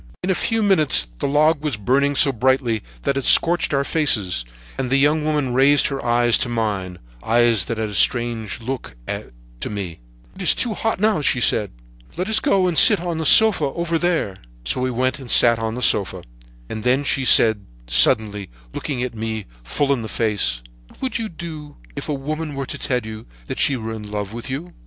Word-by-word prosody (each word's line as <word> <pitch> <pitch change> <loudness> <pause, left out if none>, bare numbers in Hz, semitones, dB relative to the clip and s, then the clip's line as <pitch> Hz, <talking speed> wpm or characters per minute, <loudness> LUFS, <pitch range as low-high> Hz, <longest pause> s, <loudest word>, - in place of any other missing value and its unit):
"In 190 - 0
a - - +3
few 225 +4 -1
minutes 155 - +2
the - - -1
log 150 +2 +2
was 145 -8 -2
burning 140 +7 +1
so 140 - +3
brightly 125 -2 0 0.2
that 140 - 0
it 135 - -2
scorched 175 +5 +3
our 140 -1 +1
faces, 110 - +1 0.4
and 130 -2 -2
the 135 - +2
young 150 +3 +2
woman 150 -4 -1
raised 140 +4 +4
her 135 -1 -5
eyes 120 -1 +2
to 120 - -1
mine—eyes 105 - -1
that 115 - -4
had 110 -1 -3
a - - -8
strange 115 0 +1
look 125 - -6 0.6
to - - -4
me. 95 -6 -6 0.4
"'It - - -10
is - - +4
too 235 - -1
hot 225 -1 -2
now,' 215 -4 +1
she 135 - +1
said; 105 -3 +2 0.5
'let 180 +2 -2
us 220 0 +2
go 195 -3 +1
and 175 -3 +2
sit 210 -4 +7
on 170 -2 -4
the 160 - +1
sofa 220 -7 +6
over 165 +3 -2
there.' 165 - -1 0.3
"So 125 - -1
we 130 - 0
went 130 +2 -1
and 130 -3 -11
sat 115 -1 +5
on 110 0 -3
the 125 - -3
sofa, 95 -3 +2 0.4
and 110 - -6
then 130 +3 +1
she 140 -1 0
said 110 -5 +4 0.2
suddenly, 100 - +3 0.2
looking 125 -4 -3
me 110 -2 -5 0.2
full 140 - 0
in 130 - -3
the 110 - -6
face: 100 - -1 0.2
"'What - - -22
would 255 -2 -2
you 225 -1 -4
do 155 -4 -9 0.2
if 140 +2 -6
a - - 0
woman 150 +2 -5
were 135 0 -4
to - - -7
tell 125 -1 -1
you 110 0 -9 0.2
that - - -6
she 135 - +1
was 110 -1 -6
in 105 -1 -10
love 105 0 -5
with 120 +3 -8
you?' 160 +7 -6
130 Hz, 205 wpm, -20 LUFS, 110-150 Hz, 0.6 s, sit